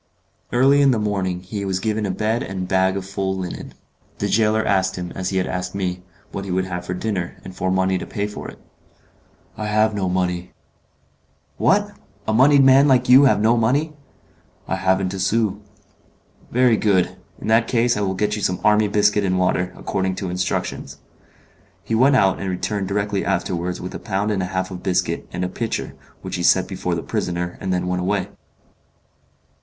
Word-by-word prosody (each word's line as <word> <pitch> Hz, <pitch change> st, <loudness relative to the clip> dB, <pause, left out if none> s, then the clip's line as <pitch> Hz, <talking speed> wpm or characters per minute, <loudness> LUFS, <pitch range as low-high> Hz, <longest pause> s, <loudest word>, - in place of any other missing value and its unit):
Early 135 Hz, +3 st, +4 dB
in 140 Hz, -, +5 dB
the 125 Hz, -, +3 dB
morning 95 Hz, -4 st, -1 dB
he 100 Hz, +2 st, -5 dB
was 95 Hz, -1 st, -1 dB
given 105 Hz, +1 st, -1 dB
a -, -, -3 dB
bed 110 Hz, +5 st, -1 dB
and 95 Hz, -1 st, -4 dB
a -, -, -3 dB
bag 95 Hz, +1 st, +1 dB
full 95 Hz, 0 st, -2 dB
of -, -, -4 dB
linen. 90 Hz, -2 st, -6 dB, 0.4 s
The -, -, -2 dB
gaoler 110 Hz, 0 st, +2 dB
asked 95 Hz, -2 st, +1 dB
him, 90 Hz, -1 st, -5 dB
as 95 Hz, -1 st, -3 dB
he 95 Hz, -, -1 dB
had 90 Hz, -, +1 dB
asked 90 Hz, +1 st, -4 dB
me, 90 Hz, -2 st, -2 dB, 0.3 s
what 95 Hz, -, -5 dB
he 100 Hz, -, -7 dB
would 95 Hz, +1 st, 0 dB
have 90 Hz, -1 st, -5 dB
for 90 Hz, -, -2 dB
dinner, 95 Hz, -3 st, -3 dB
and 95 Hz, -, -10 dB
for 95 Hz, 0 st, -1 dB
money 95 Hz, 0 st, +1 dB
to -, -, -7 dB
pay 100 Hz, -, -2 dB
for 105 Hz, -, -7 dB
it. -, -, -10 dB, 1.0 s
"I 110 Hz, -1 st, -4 dB
have 110 Hz, +1 st, +2 dB
no 95 Hz, -3 st, -1 dB
money." 90 Hz, -1 st, -2 dB, 1.0 s
"What! -, -, +2 dB, 0.4 s
a 110 Hz, -, +1 dB
moneyed 135 Hz, +4 st, +6 dB
man 135 Hz, +2 st, +6 dB
like 125 Hz, -2 st, +3 dB
you 130 Hz, +3 st, +8 dB
have 130 Hz, -, +4 dB
no 110 Hz, +3 st, +4 dB
money?" 140 Hz, +7 st, +1 dB, 0.7 s
"I -, -, -1 dB
haven't 95 Hz, 0 st, +1 dB
a 95 Hz, -, -5 dB
sou." 100 Hz, +1 st, +1 dB, 0.9 s
"Very 125 Hz, -2 st, +3 dB
good; 100 Hz, -4 st, +2 dB, 0.2 s
in -, -, -8 dB
that 115 Hz, +1 st, +4 dB
case 120 Hz, 0 st, +2 dB
I 105 Hz, -, -2 dB
will 95 Hz, -1 st, -1 dB
get 105 Hz, +2 st, 0 dB
you 105 Hz, -, -5 dB
some 90 Hz, -2 st, 0 dB
army 105 Hz, 0 st, +4 dB
biscuit 105 Hz, 0 st, +2 dB
and 95 Hz, -1 st, +1 dB
water, 90 Hz, 0 st, +1 dB
according 95 Hz, 0 st, -2 dB
to 95 Hz, -2 st, -4 dB
instructions." 90 Hz, -5 st, -3 dB, 0.9 s
He -, -, -4 dB
went 130 Hz, +5 st, +4 dB
out, 95 Hz, -6 st, +3 dB
and 95 Hz, -, -3 dB
returned 95 Hz, +2 st, -2 dB
directly 100 Hz, 0 st, -1 dB
afterwards 90 Hz, -1 st, -2 dB
with 90 Hz, -, -6 dB
a -, -, -5 dB
pound 105 Hz, -1 st, -1 dB
and 100 Hz, -2 st, 0 dB
a 90 Hz, -, -2 dB
half 95 Hz, 0 st, -3 dB
of 90 Hz, -1 st, -7 dB
biscuit, 90 Hz, -1 st, -1 dB
and 90 Hz, +1 st, -2 dB
a -, -, -1 dB
pitcher, 115 Hz, +5 st, -4 dB, 0.3 s
which -, -, -4 dB
he -, -, -3 dB
set -, -, +4 dB
before -, -, -3 dB
the -, -, -4 dB
prisoner, 90 Hz, 0 st, -3 dB
and 95 Hz, -, -2 dB
then 90 Hz, -1 st, 0 dB
went 90 Hz, 0 st, -1 dB
away. 95 Hz, +1 st, -1 dB
95 Hz, 200 wpm, -21 LUFS, 90-110 Hz, 1.0 s, you